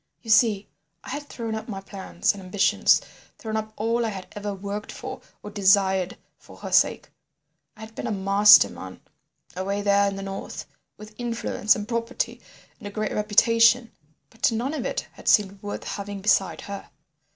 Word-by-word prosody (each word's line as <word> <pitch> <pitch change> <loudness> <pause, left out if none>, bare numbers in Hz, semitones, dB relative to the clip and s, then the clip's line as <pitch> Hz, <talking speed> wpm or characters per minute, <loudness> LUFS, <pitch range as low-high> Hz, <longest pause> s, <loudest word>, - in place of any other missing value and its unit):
"You 225 - -3
see, 210 -2 +4 0.4
I - - -10
had 290 0 -6
thrown 230 -2 -5
up 220 +1 -5
my 195 -3 -4
plans 195 0 -2
and 200 - -10
ambitions, 185 +2 +3 0.4
thrown 220 -1 -5
up 215 0 -3
all 230 +2 0
I 225 - 0
had 190 -3 -7
ever 205 0 -5
worked 200 +2 -5
for - - -7 0.2
or 210 - -8
desired 190 -2 +2 0.2
for - - -16
her - - -8
sake. - - +2 0.7
I - - -14
had 220 0 -10
been 240 - -5
a - - -2
master 200 +1 +6
man - - -10 0.6
away 200 +2 -2
there 200 0 +3
in 200 - -2
the 195 - -6
north, 195 0 -6 0.3
with 215 0 -12
influence 230 -3 +1
and 210 -1 -5
property 230 -1 -3 0.4
and 205 - -8
a - - -5
great 215 0 -2
reputation, 230 +3 +4 0.4
but 225 +1 +1
none 240 +6 -2
of 310 - -2
it - - -2
had - - -14
seemed 200 -1 +3
worth 205 0 -5
having 200 0 -5
beside 195 -1 +2
her. 200 0 -8
210 Hz, 180 wpm, -25 LUFS, 195-225 Hz, 0.7 s, master